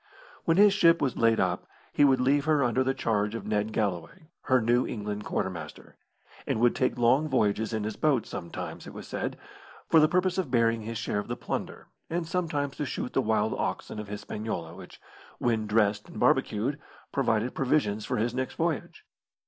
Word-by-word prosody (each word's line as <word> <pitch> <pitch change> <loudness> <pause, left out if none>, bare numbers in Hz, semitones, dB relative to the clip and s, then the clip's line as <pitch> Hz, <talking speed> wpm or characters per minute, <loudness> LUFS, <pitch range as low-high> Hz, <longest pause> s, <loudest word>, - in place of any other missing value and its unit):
When 165 - +3
his 205 0 +7
ship 170 -4 +5
was 135 -3 0
laid 115 -1 +3
up 90 -1 0 0.3
he - - +4
would 135 -2 +5
leave 140 +3 +2
her 155 -3 +3
under 125 +1 +2
the 135 +1 0
charge 105 -1 0
of 115 - -6
Ned 105 0 0
Galloway 105 - -3 0.2
her 130 -2 +4
New 120 +2 +2
England 105 -1 -4
quartermaster 85 -5 -4 0.5
and - - 0
would 120 +1 +3
take 130 - 0
long 130 +6 +3
voyages 110 -4 +1
in 110 -2 -2
his 105 0 -4
boat, 140 -7 +2
sometimes, 85 - -7
it - - -10
was - - -8
said, - - -3 0.5
for 165 - +7
the 155 - +6
purpose 185 +2 +1
of 175 -8 -2
burying 115 -2 +2
his 115 +1 -5
share 105 - -2
of 105 - -5
the - - -4
plunder, - - -5 0.2
and 170 0 -1
sometimes 150 -5 -2
to 150 - -2
shoot 125 - -4
the - - +2
wild 110 -2 +1
oxen - - -3
of 105 - -6
Hispaniola, 105 -4 -5
which, 90 0 -12 0.4
when 115 -3 0
dressed 105 -1 +1
and - - -8
barbecued, 125 +8 +1 0.3
provided 120 -3 0
provisions 125 -6 +1
for 125 - -2
his 115 +2 0
next 130 +1 -3
voyage. 165 -3 -2
120 Hz, 190 wpm, -28 LUFS, 105-140 Hz, 0.5 s, his